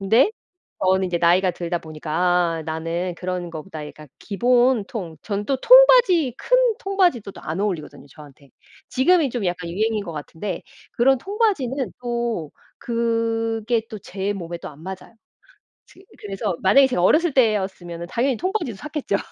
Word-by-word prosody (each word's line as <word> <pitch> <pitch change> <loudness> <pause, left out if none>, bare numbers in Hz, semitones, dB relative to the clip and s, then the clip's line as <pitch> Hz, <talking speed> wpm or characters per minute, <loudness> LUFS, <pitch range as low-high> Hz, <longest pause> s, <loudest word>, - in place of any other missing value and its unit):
근데 225 - +4 0.5
저는 190 0 +3
이제 175 -1 -1
나이가 180 +2 +3
들다 175 0 -3
보니까 155 -1 -9
아 175 -1 +1
나는 165 +3 -3
그런 180 -1 -4
것보다 160 -1 -7
약간 150 0 -12
기본 245 +1 +2
통 185 -11 -6
저는 205 -1 -3
또 275 - +1
통바지 485 - +6
큰 - - +2 0.2
통바지도 365 - +1
또 - - -12
안 165 +5 -4
어울리거든요 180 -9 -4
저한테. 140 -1 -16 0.4
지금이 300 +2 +3
좀 235 -4 -3
약간 175 -1 -3
유행인 215 +3 0
것 170 - -6
같은데 165 +5 -6 0.3
그런 265 +2 +3
통바지는 315 - -1
또 235 -9 -2 0.3
그게 230 -1 -1
또 215 - -6
제 195 +1 -4
몸에 170 -2 -6
또 - - -8
안 150 +1 -14
맞아요. 190 +4 -8 0.7
즈 - - -20 0.2
그래서 200 -1 -3
만약에 265 +9 +6
제가 250 -9 -1
어렸을 315 - +4
때였으면은 190 -8 0
당연히 250 +1 0
통바지도 370 - -2
샀겠죠. 300 -4 -3
205 Hz, 330 characters per minute, -22 LUFS, 175-250 Hz, 0.7 s, 통바지